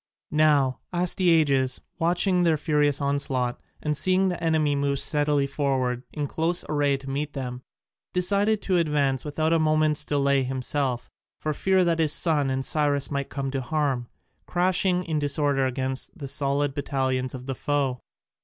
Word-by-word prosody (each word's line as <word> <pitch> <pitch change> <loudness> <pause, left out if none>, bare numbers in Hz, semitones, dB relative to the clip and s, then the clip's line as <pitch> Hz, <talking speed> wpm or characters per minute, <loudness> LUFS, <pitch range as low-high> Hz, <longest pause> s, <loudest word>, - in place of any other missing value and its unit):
Now 145 -4 +3
Astyages, 165 -7 +2 0.2
watching 180 +2 +2
their 165 -3 +3
furious 150 -2 +1
onslaught, 135 -3 -1 0.2
and 150 0 0
seeing 185 +4 +2
the 175 -1 -4
enemy 155 -3 +2
move 140 0 0
steadily 145 0 +1
forward 135 -3 -1
in 150 -2 -3
close 165 +5 -1
array 145 -2 +1
to 135 0 -9
meet 145 +1 -3
them, 125 -2 -5 0.5
decided 200 +4 +1
to 185 -2 +1
advance 145 -5 +1
without 155 +2 0
a 165 - +3
moment's 155 -1 +2
delay 140 -2 +1
himself, 130 -1 -2 0.3
for 155 - -2
fear 190 +4 +2
that 170 -1 +1
his 155 -2 +3
son 150 -5 +3
and 130 0 -1
Cyrus 145 -2 +1
might 140 -1 -2
come 135 -1 -3
to 135 -1 -2
harm, 135 -3 -1 0.4
crashing 180 0 +1
in 160 -3 -1
disorder 145 -2 +1
against 130 +6 -2
the 140 -5 -6
solid 140 +1 0
battalions 130 -2 -1
of 125 0 -9
the 135 - -3
foe. 135 -1 -1
145 Hz, 155 wpm, -25 LUFS, 135-160 Hz, 0.5 s, Now